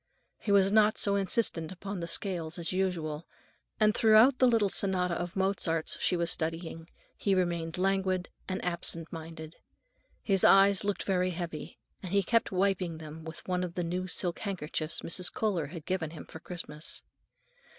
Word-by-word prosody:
He 205 Hz, -, -2 dB
was 195 Hz, -1 st, +5 dB
not 215 Hz, 0 st, +4 dB
so 200 Hz, -, +2 dB
insistent 195 Hz, -4 st, 0 dB
upon 195 Hz, +1 st, -6 dB
the 170 Hz, -, -4 dB
scales 170 Hz, -2 st, -1 dB
as 170 Hz, +1 st, -3 dB
usual, 170 Hz, -4 st, -2 dB, 0.5 s
and 215 Hz, -1 st, +4 dB
throughout 225 Hz, +5 st, +5 dB
the 255 Hz, -, +6 dB
little 225 Hz, -4 st, +3 dB
sonata 185 Hz, -2 st, 0 dB
of 175 Hz, +1 st, -4 dB
Mozart's 190 Hz, -4 st, 0 dB
she 180 Hz, -, +2 dB
was 170 Hz, -1 st, 0 dB
studying, 165 Hz, +1 st, -4 dB, 0.3 s
he 195 Hz, -2 st, +1 dB
remained 170 Hz, -2 st, -1 dB
languid 190 Hz, -1 st, 0 dB, 0.2 s
and 185 Hz, -1 st, -3 dB
absent 170 Hz, -2 st, -1 dB
minded. 160 Hz, 0 st, -8 dB, 0.7 s
His 195 Hz, -3 st, +2 dB
eyes 195 Hz, 0 st, +6 dB
looked 205 Hz, 0 st, -1 dB
very 185 Hz, -1 st, +1 dB
heavy, 170 Hz, -3 st, -6 dB, 0.2 s
and 185 Hz, -, -7 dB
he 200 Hz, 0 st, +3 dB
kept 230 Hz, +5 st, +1 dB
wiping 185 Hz, -3 st, 0 dB
them 160 Hz, 0 st, -9 dB
with 160 Hz, 0 st, -9 dB
one 180 Hz, -1 st, 0 dB
of 175 Hz, -1 st, -5 dB
the 180 Hz, -, -1 dB
new 180 Hz, +2 st, -2 dB
silk 180 Hz, -1 st, 0 dB
handkerchiefs 165 Hz, -5 st, -2 dB
Mrs. 180 Hz, +1 st, +2 dB
Kohler 190 Hz, -9 st, -1 dB
had 160 Hz, 0 st, -9 dB
given 180 Hz, -4 st, -1 dB
him 160 Hz, 0 st, -10 dB
for 160 Hz, -, -11 dB
Christmas. 160 Hz, -3 st, -7 dB
180 Hz, 170 wpm, -30 LUFS, 165-195 Hz, 0.7 s, the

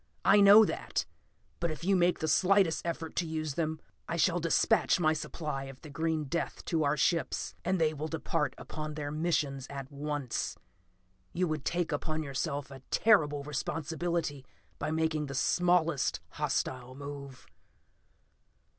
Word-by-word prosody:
I 205 Hz, -, +7 dB
know 205 Hz, +2 st, +9 dB
that. -, -, -2 dB, 0.5 s
But 170 Hz, -, 0 dB
if 155 Hz, +1 st, -6 dB
you 195 Hz, +2 st, +3 dB
make 175 Hz, 0 st, +3 dB
the 160 Hz, -, -2 dB
slightest 185 Hz, +1 st, +3 dB
effort 165 Hz, -1 st, -4 dB
to 170 Hz, -, +1 dB
use 155 Hz, -2 st, -3 dB
them, 160 Hz, 0 st, -2 dB, 0.3 s
I 170 Hz, -, -1 dB
shall 175 Hz, +2 st, +3 dB
dispatch 165 Hz, +2 st, +3 dB
a 155 Hz, -2 st, +3 dB
supply 150 Hz, -2 st, -4 dB
of 135 Hz, -1 st, -10 dB
the 150 Hz, -, -10 dB
green 160 Hz, +1 st, -1 dB
death 150 Hz, +5 st, -3 dB
to 165 Hz, -3 st, +1 dB
our 145 Hz, +1 st, +1 dB
ships, 165 Hz, +3 st, 0 dB
and 185 Hz, -1 st, +1 dB
they 155 Hz, -1 st, +2 dB
will 155 Hz, +1 st, -4 dB
depart 150 Hz, -3 st, -1 dB
upon 155 Hz, -1 st, -6 dB
their 145 Hz, -1 st, -4 dB
missions 150 Hz, -4 st, -1 dB
at 135 Hz, -1 st, -7 dB
once. 145 Hz, -3 st, -3 dB, 0.8 s
You 180 Hz, +1 st, +1 dB
would 155 Hz, -3 st, -3 dB
take 175 Hz, -1 st, 0 dB
upon 155 Hz, +2 st, -2 dB
yourself 140 Hz, 0 st, -3 dB
a 135 Hz, -1 st, -10 dB
terrible 150 Hz, -10 st, +3 dB
responsibility 155 Hz, +1 st, -2 dB, 0.4 s
by 145 Hz, -, -2 dB
making 160 Hz, -1 st, 0 dB
the 135 Hz, -, -6 dB
smallest 170 Hz, -1 st, +2 dB
hostile 130 Hz, 0 st, -2 dB
move. 140 Hz, -2 st, -8 dB
155 Hz, 155 wpm, -31 LUFS, 145-170 Hz, 0.8 s, know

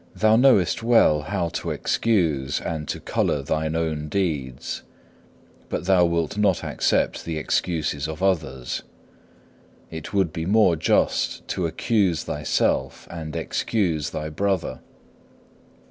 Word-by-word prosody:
2. -, -, -15 dB
Thou 110 Hz, 0 st, +6 dB
knowest 115 Hz, -8 st, +4 dB
well 115 Hz, -10 st, +4 dB
how 85 Hz, +3 st, -2 dB
to -, -, -4 dB
excuse 80 Hz, -11 st, 0 dB
and 80 Hz, -3 st, -4 dB
to -, -, -3 dB
colour 70 Hz, -, 0 dB
thine 80 Hz, +2 st, -1 dB
own 80 Hz, -2 st, -2 dB
deeds, 75 Hz, -10 st, -2 dB, 0.9 s
but -, -, -3 dB
thou 95 Hz, -2 st, +5 dB
wilt 85 Hz, +3 st, -1 dB
not 100 Hz, -4 st, +2 dB
accept -, -, 0 dB
the 80 Hz, -2 st, -4 dB
excuses 75 Hz, -2 st, -1 dB
of 80 Hz, +3 st, -6 dB
others. 75 Hz, -10 st, -1 dB, 1.1 s
It 80 Hz, -1 st, -7 dB
would 95 Hz, -5 st, +1 dB
be 80 Hz, +1 st, -3 dB
more 105 Hz, -4 st, +4 dB
just 80 Hz, -, +1 dB
to 90 Hz, -, -1 dB
accuse 95 Hz, -2 st, +1 dB
thyself 75 Hz, 0 st, -1 dB
and 80 Hz, -3 st, -6 dB
excuse 85 Hz, -9 st, -1 dB
thy 75 Hz, 0 st, -4 dB
brother. 95 Hz, +5 st, -1 dB
85 Hz, 130 wpm, -24 LUFS, 75-95 Hz, 1.1 s, Thou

